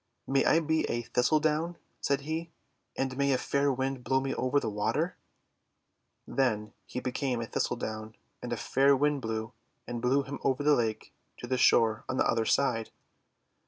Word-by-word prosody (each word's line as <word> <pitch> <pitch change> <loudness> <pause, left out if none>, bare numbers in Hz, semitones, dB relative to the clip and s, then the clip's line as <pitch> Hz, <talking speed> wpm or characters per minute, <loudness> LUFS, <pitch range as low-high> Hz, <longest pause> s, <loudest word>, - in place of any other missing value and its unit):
'May 135 0 +2
I 165 - +5
be 160 0 +1
a 120 0 -1
Thistledown," 155 +7 +1 0.2
said 140 0 0
he, 160 +3 -4 0.5
:'and 135 -1 -1
mav 140 +1 +1
a 135 - +3
fair 140 +2 +1
Wind 130 0 -2
blow 130 +1 +2
me 135 0 -2
over 130 +3 +1
the - - -4
water!' 110 - -1
t/ - - -41 1.1
Then 110 -6 0
he 125 - -4
became 125 -1 -2
a 115 - -2
Thistledown, 110 -2 -3 0.3
and 120 - -5
a 120 - -1
fair 140 +4 +3
Wind 145 0 +1
blew, 110 0 -3 0.3
and 120 -1 -5
blew 135 +3 +2
him 140 +1 -6
over 135 +1 +1
the 150 0 +5
lake 110 -5 -1 0.2
to - - -7
the 130 +1 0
shore 110 -3 +4
on 130 - -1
the - - +3
other 115 -1 +1
side. 120 -3 +1
130 Hz, 180 wpm, -30 LUFS, 115-140 Hz, 1.1 s, I